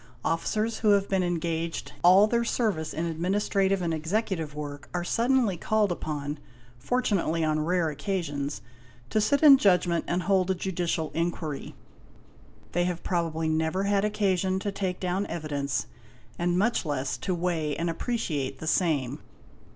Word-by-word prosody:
Officers, 215 +7 0
who 210 -2 +4
have 200 0 +2
been 190 -1 +1
engaged 170 -1 -2
all 185 +4 +8
their 235 +2 +1
service 210 -9 -1
in 165 - -2
administrative 190 +3 0
and 165 -1 0
executive 160 -1 -2
work, 145 -1 -7
are 175 - -1
suddenly 235 -1 +2
called 210 +2 +1
upon, 150 -3 -4 0.4
fortunately 180 - 0
on 155 0 +1
rare 175 0 +1
occasions, 145 - -3 0.5
to 215 - +2
sit 280 +8 +2
in 280 -3 +9
judgment 180 -5 +3
and 175 +1 0
hold 190 -2 +2
a 190 - +2
judicial 175 -3 -2
inquiry. 165 -3 -3 1.0
They 175 +1 +1
have 180 -1 -3
probably 165 -2 -1
never 160 +4 0
had 200 0 +2
occasion 190 -3 +1
to 205 - -2
take 190 -2 -3
down 185 +2 -1
evidence, 140 -8 -2 0.5
and 175 0 +1
much 225 +5 +2
less 140 -4 -2
to 185 - -1
weigh 165 -4 -1
and 170 - -2
appreciate 165 - -2
the - - -8
same. 150 -5 +1
175 Hz, 150 wpm, -27 LUFS, 160-195 Hz, 1.0 s, in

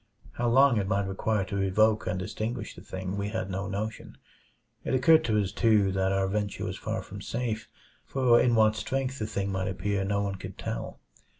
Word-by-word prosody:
How 120 - -2
long 135 0 +5
it 100 -2 0
might 100 0 +1
require 100 +1 0
to 100 0 -2
evoke 110 +3 +2
and 90 +1 -1
extinguish 110 +3 -4
the - - -12
thing, 95 +1 -5
we 100 +1 -2
had 110 -3 -3
no 95 +1 -3
notion. 105 +3 -5 0.7
It - - 0
occurred 155 +5 +5
to 110 -2 +2
us, 100 -2 -1
too, 105 -4 +3
that 95 0 +1
our 95 0 +1
venture 100 0 -2
was - - -3
far - - -4
from - - -9
safe; 115 -2 -3 0.4
for 125 -3 +4
in 120 -1 +3
what 110 -1 +4
strength 135 +3 -2
the 110 - -2
thing 100 -2 -2
might 95 -1 -1
appear 100 +1 -1
no 100 +1 0
one 100 -1 -3
could - - -9
tell. - - -5
105 Hz, 205 wpm, -28 LUFS, 95-115 Hz, 0.7 s, long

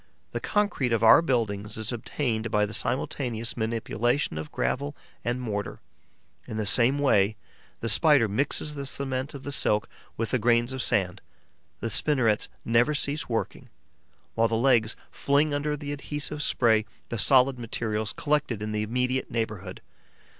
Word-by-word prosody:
The - - -3
concrete 205 - 0
of 115 -1 +1
our 115 - +8
buildings 105 -8 -1
is 110 +1 -3
obtained 115 -1 -2
by 105 -1 +2
the 105 - -7
simultaneous 120 -2 -1
manipulation 115 - -1
of 80 - -7
gravel 145 +2 -2 0.3
and 120 +1 -1
mortar. 105 -5 -4 0.7
In 110 - -5
the 110 - -1
same 125 +6 +3
way, 110 -7 +3 0.5
the 115 - -2
Spider 140 +1 +5
mixes 140 +7 -1
the 140 -2 -4
cement 135 +1 -2
of 135 - -8
the 145 - -5
silk 105 -6 +2 0.3
with 115 0 -2
the 125 - +2
grains 120 +2 +2
of 130 - -3
sand; 95 -3 0 0.6
the 115 - -2
spinnerets 120 -5 +2 0.2
never 120 +6 +3
cease 145 0 -1
working, 115 -1 -3 0.6
while 115 0 +3
the 115 - -1
legs 115 -2 +3 0.2
fling 145 +2 +1
under 150 +1 -1
the 145 0 -6
adhesive 145 +1 -5
spray 110 -6 +2 0.2
the 115 - -3
solid 130 +2 +4
materials 110 -2 -2
collected 145 -8 -1
in 105 - -3
the 105 0 -1
immediate 125 +4 -1
neighbourhood. 105 -5 -4
120 Hz, 155 wpm, -27 LUFS, 110-140 Hz, 0.7 s, our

